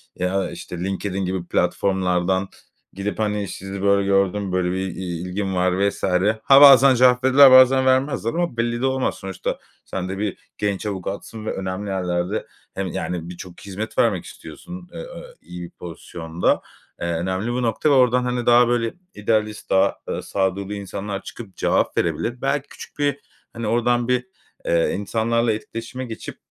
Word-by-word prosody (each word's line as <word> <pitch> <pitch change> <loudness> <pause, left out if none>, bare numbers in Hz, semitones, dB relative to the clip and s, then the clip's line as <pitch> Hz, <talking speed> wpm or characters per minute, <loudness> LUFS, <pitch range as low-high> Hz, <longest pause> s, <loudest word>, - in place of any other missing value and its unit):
ya, 90 0 -1
işte, 90 - -8
LinkedIn 95 +1 -2
gibi 90 -1 -3
platformlardan 95 0 +1 0.5
gidip, 100 -1 -4
hani, 105 -2 -1
“Sizi 95 +2 -7
böyle 100 0 +3
gördüm, 100 0 +1
böyle 90 -1 0
bir - - -2 0.2
i - - -6 0.2
ilgim 95 +1 -3
var, 90 +2 +2
vs.“ - - -11 0.4
Ha 140 +1 +7
bazen 135 -2 +9
cevap 125 +1 +4
verirler, 130 +1 +8
bazen 130 +1 +7
vermezler 130 -2 +2
ama 170 -8 -2
belli 120 0 -1
de 135 - +1
olmaz. 130 0 0
Sonuçta 95 -1 -4 0.3
sen 95 -1 -4
de 95 - -4
bir 100 -1 -2 0.2
genç 100 0 -2
avukatsın 100 +3 -5
ve - - -2
önemli 95 +2 -4
yerlerde 90 +1 -2 0.3
hem 95 -1 -3
yani 85 0 -4
birçok 90 0 -10
hizmet 100 +3 -6
vermek 100 -7 +2
istiyorsun, 175 - -10
eee, - - -7
ö - - -9
iyi 90 - -9
bir 85 - -8
pozisyonda. 85 0 -3 0.4
Eee, 85 - -1
önemli 95 +7 -2
bu 125 +1 -1
nokta 115 +6 +1
ve - - +5
oradan, 125 -1 +4
hani, 125 -1 -2
daha, 120 0 +6
böyle, 115 -1 0 0.2
idealist, 105 0 -1
daha, 95 +1 +3
ııı, - - -3
sağduyulu 95 +1 -1
insanlar 100 0 -5
çıkıp 105 -6 -10
cevap - - +1
verebilir. 120 +1 -1
Belki 140 +1 -1
küçük - - -12
bir, 145 -1 +1 0.3
hani, 115 -1 -4
oradan 120 +1 +1
bir, 125 0 +1 0.4
eee, 85 -1 +2
insanlarla 115 +3 0
etkileşime 115 +4 -6
geçip 115 -2 -8
105 Hz, 165 wpm, -22 LUFS, 95-120 Hz, 0.5 s, bazen